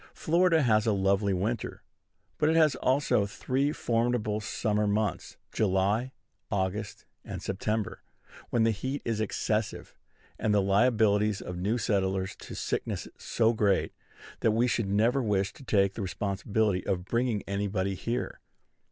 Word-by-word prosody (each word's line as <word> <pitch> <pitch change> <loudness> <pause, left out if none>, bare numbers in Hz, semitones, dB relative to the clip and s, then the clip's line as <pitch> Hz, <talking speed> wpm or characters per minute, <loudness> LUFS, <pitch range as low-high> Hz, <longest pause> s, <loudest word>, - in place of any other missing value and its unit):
Florida 165 -1 +3
has 110 -2 +3
a 110 - +3
lovely 100 +1 +2
winter; 105 +5 -2 0.6
but 150 - +3
it 160 - +2
has 155 -3 +5
also 130 -7 +1
three 135 +7 -1
formidable 115 -5 0
summer 105 0 -1
months, 105 -3 -1
July, 105 +5 +1 0.4
August, 100 +1 -2 0.2
and - - -6
September, 105 +2 -2 0.5
when 115 - +2
the 115 - +4
heat 130 +7 -4
is 115 -2 -1
excessive, 110 +1 -2 0.5
and 105 -1 +1
the - - +5
liabilities 105 0 +3
of 90 - -6
new 105 +6 0
settlers 95 -4 0
to - - -9
sickness - - -3
so 115 0 +1
great, 105 -3 +1 0.5
that 110 - +2
we 115 +2 +3
should 115 -4 0
never 115 +7 +2
wish 100 -4 0
to - - -14
take 100 -5 +2
the 110 - -5
responsibility 100 +1 -1
of 90 -2 -1
bringing 115 -1 0
anybody 100 -1 -1
here. 120 +6 -3
105 Hz, 145 wpm, -29 LUFS, 100-120 Hz, 0.6 s, has